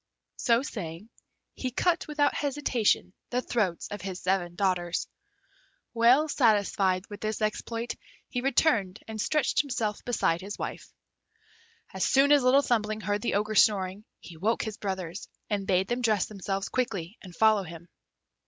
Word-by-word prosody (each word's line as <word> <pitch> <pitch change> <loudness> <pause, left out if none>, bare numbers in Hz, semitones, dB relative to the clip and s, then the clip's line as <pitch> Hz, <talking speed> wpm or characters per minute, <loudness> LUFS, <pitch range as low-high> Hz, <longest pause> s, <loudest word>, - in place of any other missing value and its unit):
So 235 +1 +2
saying, 185 - -6 0.4
he 255 - -3
cut 335 +8 0
without 295 -1 +1
hesitation 270 -9 0 0.2
the 250 - 0
throats 210 -9 -1
of 205 - -6
his 185 -1 -5
seven 180 -2 -1
daughters. 175 -3 0 0.9
Well 245 +6 +5
satisfied 200 -8 +2
with 205 -1 -9
this 215 0 -2
exploit, 230 +2 -2 0.3
he 245 - -3
returned 240 -8 +2
and 220 -1 -4
stretched 300 0 +2
himself 230 -7 -3
beside 175 -8 0
his 200 +2 -6
wife. - - -6 1.0
As 190 - -2
soon 275 +2 +4
as 290 -1 +6
Little 260 +3 +5
Thumbling 215 -3 0
heard 205 +1 -1
the 235 - -1
Ogre 210 +1 0
snoring, 200 -2 +3 0.2
he 170 - -12
woke 215 +7 0
his 215 -2 -5
brothers, 190 -2 -5 0.2
and 200 -2 -1
bade 190 -1 +2
them 240 +2 -1
dress 215 -5 +2
themselves 195 -1 -4
quickly 215 -6 -3
and 180 -3 -12
follow 220 0 +4
him. 170 -1 -10
210 Hz, 155 wpm, -28 LUFS, 190-245 Hz, 1.0 s, as